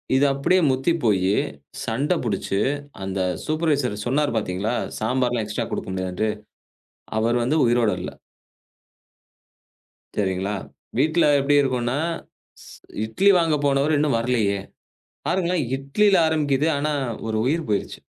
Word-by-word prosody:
இது 135 +2 +4
அப்படியே 180 +7 +2
முத்தி 130 +5 +1
போயி, 95 -4 +2 0.5
சண்டை 140 +10 0
புடிச்சு, 100 -3 -1 0.4
அந்த 95 0 -3 0.3
சூப்பர்வைசர் 145 -9 0
சொன்னார் 140 0 +1
பாத்தீங்களா, 105 +3 -1 0.2
சாம்பார்லாம் 125 0 0
எக்ஸ்ட்ரா 105 0 -3
கொடுக்க - - -4
முடியாதுன்டு, 95 +3 -1 0.9
அவர் 115 +2 +2
வந்து 140 +7 +1
உயிரோட 120 -2 +3
இல்ல. - - -5 2.1
சரிங்களா, 95 0 0 0.4
வீட்ல 155 +5 +3
எப்படி 140 +1 +2
இருக்கும்னா, 125 -1 0 0.6
ஷ் - - -13 0.3
"இட்லி 190 - +3
வாங்க 165 -2 +2
போனவரு 140 +2 +2
இன்னும் 145 -6 +2
வரலையே!" 115 -4 +1 0.7
பாருங்களேன், 180 -2 +1
இட்லில 190 +10 +2
ஆரம்பிக்குது. 150 -2 +1
ஆனா, 150 +2 0 0.4
ஒரு 110 - -1
உயிர் 160 +5 0
போயிருச்சு. 105 - -2
130 Hz, 115 wpm, -23 LUFS, 110-150 Hz, 2.1 s, இது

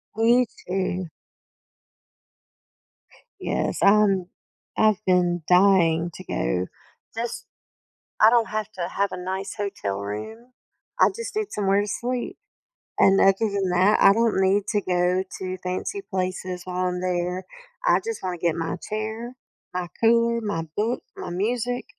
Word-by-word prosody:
Me 240 +3 +4
too. 185 -3 -3 2.3
Yes. - - -1
I'm 200 -3 +4 0.5
I've 215 -1 +3
been 175 -2 +2
dying 180 -3 +4
to 185 - -9
go. 90 - -1 0.5
Just 235 0 -4 0.8
I 215 - +9
don't 235 -1 +3
have 215 0 -3
to 175 -2 -3
have 200 +2 -1
a - - -5
nice 190 +2 -4
hotel 195 - -3
room, 220 - -7 0.5
I - - +6
just 465 -2 -6
need 430 -1 -1
somewhere 200 -1 +2
to 205 - -3
sleep. 250 - -3 0.6
And 195 0 +5
other 195 - +6
than 200 -4 0
that, 185 +4 +4
I 195 - +8
don't 225 -3 +2
need 195 +1 +3
to 210 -2 +1
go 180 0 +1 0.2
to 185 0 -4
fancy 185 - -3
places 185 -1 -3
while 185 0 -1
I'm 180 0 -3
there. 180 0 -2 0.4
I - - +5
just 455 0 -4
wanna 180 -1 -3
get 170 -1 0
my 165 0 -3
chair, 220 +3 -4 0.4
my 180 -1 -2
cooler, 235 0 +3
my 205 -7 -2
book, 225 +4 -1
my - - -6
music, 240 +6 -1
195 Hz, 140 wpm, -24 LUFS, 180-225 Hz, 2.3 s, I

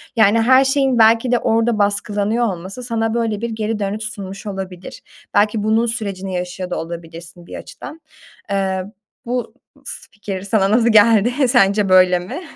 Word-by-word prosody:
Yani 220 0 +4
her 260 +3 +5
şeyin 270 -2 +1
belki 225 +2 +4
de 245 - +4
orada 230 0 +1
baskılanıyor 205 +3 0
olması 190 +5 -5
sana 225 -2 -2
böyle 225 -3 -1
bir 235 - -2
geri 220 0 -3
dönüş 205 +2 -3
sunmuş 195 -2 -7
olabilir. 190 -2 -7 0.3
Belki 210 +1 +2
bunun 220 +2 +2
sürecini 200 -5 -4
yaşıyor 180 0 -4
da - - -3
olabilirsin 170 +1 -9
bir - - -9
açıdan. 320 +2 -10 0.5
Eee, 190 -1 -1 0.4
bu 240 -1 -3 0.3
s - - -8
fikir 200 -2 -6
sana 200 0 +1
nasıl 235 +1 +3
geldi? 230 +5 +4
Sence 200 -4 +3
böyle 185 -1 +5
mi? 180 - -7
210 Hz, 160 wpm, -18 LUFS, 190-230 Hz, 0.5 s, her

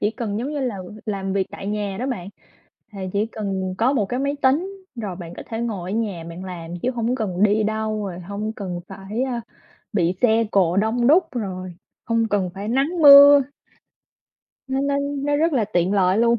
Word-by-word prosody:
chỉ 210 - +1
cần, 220 -3 -4
giống 255 +5 -3
như 295 - -2
là, 245 -6 -2
ừ, 190 +3 -9
làm 195 -2 -2
việc 195 -1 0
tại 195 - -8
nhà 205 -1 -2
đó 255 - -2
bạn. 195 -8 -4 0.6
Thì 200 - -9
chỉ 205 +2 +1
cần 195 -4 -3
có 250 +4 +3
một 215 -8 +1
cái 250 +6 -2
máy 280 +1 -1
tính 370 +9 +1
rồi 205 -6 -4
bạn 170 -2 -8
có - - -7
thể 225 - -5
ngồi 200 -6 -3
ở - - -1
nhà 200 -7 -2
bạn 175 +3 -8
làm 170 -3 -7
chứ 255 - +1
hổng 240 0 -1
cần 205 -6 -2
đi 210 +1 +4
đâu, 215 -1 -2
rồi 180 -2 -6
hông 200 +4 -4
cần 185 -5 -5
phải, 195 +4 -4
a, 250 -3 -2 0.5
bị 175 -3 +2
xe 230 -1 +4
cộ 180 -2 +2
đông 225 +4 +2
đúc, 340 +5 +6
rồi 185 -6 -5 0.3
hông 230 -1 +1
cần 195 -3 0
phải 200 +2 -5
nắng 280 +8 0
mưa. 285 0 +10 1.3
Nó 265 0 0
nó 280 0 0
nó 285 0 -1
rất 325 +3 +2
là 245 -6 +2
tiện 180 0 0
lợi 190 0 +3
luôn. 235 0 +3
215 Hz, 210 wpm, -22 LUFS, 195-250 Hz, 1.3 s, mưa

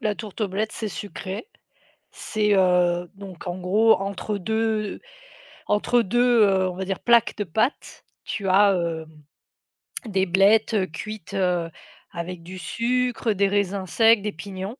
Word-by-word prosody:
la 210 -1 0
tourte 215 0 -9
aux 200 - 0
blettes 215 +3 -2
c'est 220 - -4
sucré. 200 - -7 0.6
C'est, 210 -1 0
heu 180 -2 +2
donc 190 -3 -11
en 175 0 -3
gros 210 +5 +4
entre 200 +2 -3
2 220 +1 -1 0.7
entre 220 +3 +2
2, 240 +2 +3
heu, 190 -2 +3
on 180 - -5
va 190 +1 -4
dire 190 0 -3
plaques 235 -2 +3
de 205 - -2
pâtes, 220 - -2 0.2
tu 200 -3 -4
as, 200 +1 +5
hem, 165 -3 -2 1.0
des 195 -3 0
blettes, 200 +5 +3
heu, 190 -3 +2
cuites, 210 +4 -8
heu, 180 -3 0 0.4
avec 170 0 -6
du 185 +2 -10
sucre, 240 +3 -1
des 200 0 +2
raisins 200 -1 -1
secs, 225 +3 +4
des 210 +1 -3
pignons. 190 +4 -7
200 Hz, 155 wpm, -24 LUFS, 185-220 Hz, 1.0 s, as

